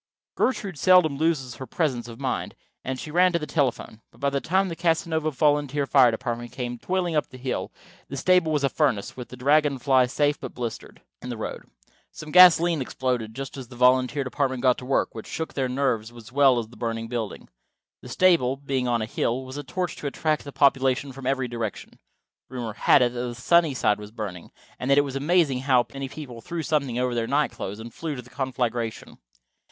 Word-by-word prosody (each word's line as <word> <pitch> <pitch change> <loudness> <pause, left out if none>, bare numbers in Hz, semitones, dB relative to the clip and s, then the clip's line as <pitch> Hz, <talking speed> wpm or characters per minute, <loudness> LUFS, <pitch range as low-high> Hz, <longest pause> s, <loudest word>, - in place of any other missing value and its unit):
Gertrude 200 - -1
seldom 180 -6 +5
loses 140 -5 -1
her 130 - -7
presence 125 -4 -1
of 115 -1 -10
mind, - - -3 0.3
and 130 0 -4
she 150 - -7
ran 180 +3 +4
to - - +3
the 155 - -4
telephone. 130 -7 -2
But - - -23
by 140 0 0
the 140 0 -1
time 190 +3 +1
the 170 - -5
Casanova 160 -2 0
volunteer 145 0 +1
fire 130 -2 +5
department 120 +1 -4
came 120 -2 -5
toiling 180 0 -1
up 150 - +1
the 130 - -12
hill 130 0 -3 0.4
the 140 - -6
stable 180 +2 +3
was 150 -2 0
a 140 - +3
furnace, 130 -11 0
with 125 -2 -8
the 125 - -10
Dragon 145 +2 +3
Fly 130 -1 +3
safe 145 +3 0
but - - -8
blistered, 120 -3 -6 0.2
in 125 - -7
the 120 - -4
road. 110 - -6 0.5
Some 155 0 -9
gasolene 175 -3 +7
exploded 125 -4 -2
just 135 +1 -6
as 130 -3 -7
the 120 - -13
volunteer 130 +3 +3
department 130 -1 -2
got 130 -2 +3
to 125 - -9
work, 135 - 0
which 110 - -8
shook 160 - -5
their 130 -2 -1
nerves 125 -4 -1
as 120 -1 -13
well 135 -2 +5
as 115 -2 -3
the 120 - -16
burning 115 -1 -3
building. 115 -3 -5 0.5
The - - -11
stable, 165 -8 +3
being 135 -2 -2
on 120 -2 +1
a - - -2
hill, 120 +3 -2
was 130 +2 -8
a 145 - -5
torch 175 +5 -3
to 145 - -4
attract 155 +2 -1
the 140 - -7
population 135 -1 +2
from 130 -1 -7
every 135 -1 0
direction. 115 -4 -6 0.5
Rumor 120 -4 -5
had 125 +4 +4
it 120 0 0
that 120 0 -4
Sunnyside 135 -6 +2
was 105 0 -9
burning, 105 -6 -7 0.3
and 130 - -3
it 140 +1 +5
was 140 -2 -6
amazing 145 -2 +2
how 130 -2 +3
many 135 -1 -5
people 130 -6 -9
threw 165 +7 -4
something 140 -6 0
over 125 0 0
their 115 -1 -1
night 145 +3 +1
clothes 100 +3 -6
and 115 0 -9
flew 160 -3 -4
to 125 - -7
the 125 - -18
conflagration. 125 -4 -3
130 Hz, 210 wpm, -25 LUFS, 120-150 Hz, 0.5 s, gasolene